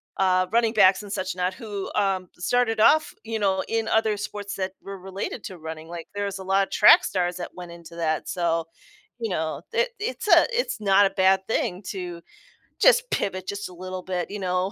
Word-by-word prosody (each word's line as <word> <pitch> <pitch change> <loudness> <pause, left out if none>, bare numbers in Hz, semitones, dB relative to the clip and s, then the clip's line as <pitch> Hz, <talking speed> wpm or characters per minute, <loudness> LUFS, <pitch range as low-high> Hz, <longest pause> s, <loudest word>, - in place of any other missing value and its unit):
uh, 185 -1 +2
running 230 -1 +2
backs 195 -1 +5
and 200 - -9
such 190 -2 -3
not 180 +1 -1
who, 205 -1 -6
um, 190 -3 0
started 225 +2 +1
off, 310 +8 +4
you 225 0 -2
know, 195 -2 +1
in 225 -1 -1
other 220 -1 +2
sports 205 -1 -5
that 190 -1 -3
were 195 0 -8
related 190 +4 -6
to 185 -3 -7
running, 160 0 -8
like, 170 -1 -7
there's 200 -1 -3
a - - -7
lotta 195 +1 +1
track 210 - +7
stars 180 -2 -1
that 175 - -6
went 175 -1 -9
into 170 0 -12
that, 160 -2 -1
so, 165 -2 0 0.5
you 225 -2 -2
know, 160 -2 -2
it 485 +1 +2
it's 430 0 -4
a - - +7
it's 485 - -1
not 200 -1 +5
a - - -3
bad 190 0 +3
thing 185 -3 -1
to 180 -3 -6 0.6
just - - +5
pivot 185 -1 -2
just 200 0 -4
a - - -12
little 185 +1 -7
bit, 180 -1 -3
you 210 - -5
know, 185 +1 -1
190 Hz, 205 wpm, -25 LUFS, 180-210 Hz, 0.6 s, track